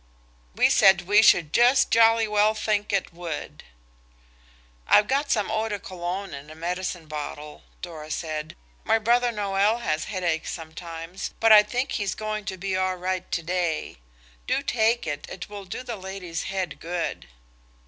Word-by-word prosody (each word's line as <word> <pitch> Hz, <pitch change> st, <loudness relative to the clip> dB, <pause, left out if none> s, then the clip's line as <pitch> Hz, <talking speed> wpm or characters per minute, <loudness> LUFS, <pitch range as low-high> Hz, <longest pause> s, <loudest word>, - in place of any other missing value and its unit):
We -, -, +4 dB
said 190 Hz, -1 st, +6 dB
we 205 Hz, +4 st, +5 dB
should 165 Hz, -7 st, +4 dB
just 250 Hz, +3 st, +4 dB
jolly 225 Hz, 0 st, +5 dB
well 210 Hz, +1 st, +3 dB
think 210 Hz, -1 st, -1 dB
it 195 Hz, -3 st, -1 dB
would. 170 Hz, -3 st, -6 dB, 1.2 s
"I've 210 Hz, -, +5 dB
got 280 Hz, +2 st, 0 dB
some 215 Hz, -4 st, +1 dB
Eau 220 Hz, 0 st, -1 dB
de 205 Hz, -, -2 dB
Cologne 185 Hz, 0 st, -5 dB
in 140 Hz, +2 st, -9 dB
a 155 Hz, -, -10 dB
medicine 180 Hz, +1 st, -4 dB
bottle," 150 Hz, 0 st, -7 dB, 0.2 s
Dora 155 Hz, -3 st, -8 dB
said; 155 Hz, -1 st, -4 dB, 0.3 s
"my 225 Hz, -, +3 dB
brother 240 Hz, +2 st, +2 dB
Noël 205 Hz, +2 st, +1 dB
has 155 Hz, -7 st, -1 dB
headaches 175 Hz, -5 st, -2 dB
sometimes, 165 Hz, +2 st, -7 dB
but 225 Hz, 0 st, +4 dB
I 210 Hz, -1 st, +10 dB
think 245 Hz, +6 st, -2 dB
he's 200 Hz, -4 st, -2 dB
going 215 Hz, -1 st, -4 dB
to 190 Hz, -1 st, -4 dB
be 190 Hz, +1 st, -2 dB
all 185 Hz, 0 st, 0 dB
right 185 Hz, 0 st, -3 dB
to 165 Hz, -, -1 dB
day. 175 Hz, -, -2 dB, 0.5 s
Do -, -, 0 dB
take 230 Hz, -2 st, +1 dB
it, 145 Hz, -2 st, -4 dB
it 190 Hz, -, -8 dB
will 205 Hz, -1 st, -8 dB
do 250 Hz, -, -6 dB
the 235 Hz, -3 st, -5 dB
lady's 190 Hz, -3 st, -6 dB
head 190 Hz, -4 st, -3 dB
good." 170 Hz, -, -4 dB
190 Hz, 165 wpm, -25 LUFS, 170-215 Hz, 1.2 s, I